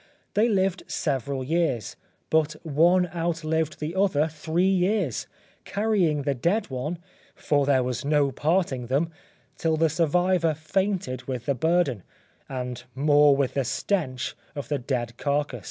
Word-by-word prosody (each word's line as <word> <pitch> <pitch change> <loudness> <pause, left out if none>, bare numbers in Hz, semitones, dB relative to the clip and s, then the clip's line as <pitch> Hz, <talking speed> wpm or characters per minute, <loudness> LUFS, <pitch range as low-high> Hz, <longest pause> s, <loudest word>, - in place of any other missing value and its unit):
They 220 +3 +3
lived 195 -3 +1
several 135 -2 -2
years, 150 - 0 0.4
but 160 -1 +3
one 170 +4 +4
outlived 160 -2 -1
the 155 +2 -3
other 185 -6 +2
three 160 +3 -1
years, 190 - +1 0.4
carrying 195 -9 +1
the 140 0 +1
dead 175 - 0
one 130 +7 -3 0.4
(for 145 -2 +1
there 130 -3 +4
was 125 -1 -3
no 145 -1 +2
parting 145 -4 0
them) 145 +6 0 0.5
till 160 -1 +1
the 165 0 +3
survivor 165 +1 +2
fainted 160 -5 -2
with 125 -3 -4
the 140 - +2
burden, 150 - +1 0.5
and 125 -2 -4
more 145 0 +5
with 135 -2 0
the 135 - +1
stench 130 - -2 0.2
of 145 - -6
the 145 -2 0
dead 120 -2 -3
carcase. 145 -3 -1
155 Hz, 140 wpm, -26 LUFS, 135-175 Hz, 0.5 s, more